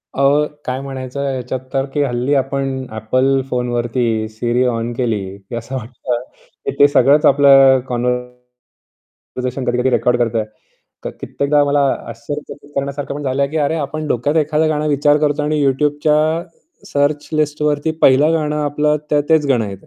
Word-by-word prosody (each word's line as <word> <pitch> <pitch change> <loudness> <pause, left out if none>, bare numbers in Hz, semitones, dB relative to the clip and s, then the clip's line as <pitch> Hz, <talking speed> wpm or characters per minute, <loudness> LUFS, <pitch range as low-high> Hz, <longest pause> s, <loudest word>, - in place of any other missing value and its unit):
अहो, 140 +2 +3 0.2
काय 130 +1 -2
म्हणायचं, 135 -1 -6
ह्याच्यात 130 0 -4
तर 135 0 +1
की 145 - +1
हल्ली 125 +1 -1
आपण 135 -1 -1
Apple 130 +5 +1
फोनवरती 120 -1 -1 0.3
Siri 120 +3 0
ऑन 115 +1 -3
केली 115 -3 -1 0.2
की 100 +4 -9
असं 115 +3 -6
वाटतं. 125 0 -4 0.6
ते 145 - +8
सगळंच 145 +1 +4
आपलं 135 -1 +6
कॉन्वरसेशन 125 0 -3 1.1
कधी-कधी 125 +2 +1
रेकॉर्ड 125 0 +2
करतोय. 115 -2 0 0.6
क - - -4
कित्येकदा 145 +1 +1
मला 145 0 +1 0.3
आश्चर्यचकीत 145 +5 -8
करण्यासारखं 140 0 -3
पण 145 - -6
झालंय 140 0 0
की 155 - -5
"अरे, 150 +3 0
आपण 155 +1 -4
डोक्यात 145 +6 0
एखादं 155 0 +2
गाणं 155 -1 -1
विचार 145 0 +3
करतो 145 0 -1
आणि 150 0 0
YouTubeच्या 145 +2 +2 0.7
सर्च 145 +1 0
लिस्टवरती 150 0 0
पहिलं 140 +4 +5
गाणं 150 -2 -1
आपलं 150 +1 +1
त - - +2 0.2
तेच 160 -2 +4
गाणं 120 -6 +1
येतं." 95 0 -11
135 Hz, 150 wpm, -18 LUFS, 125-145 Hz, 1.1 s, ते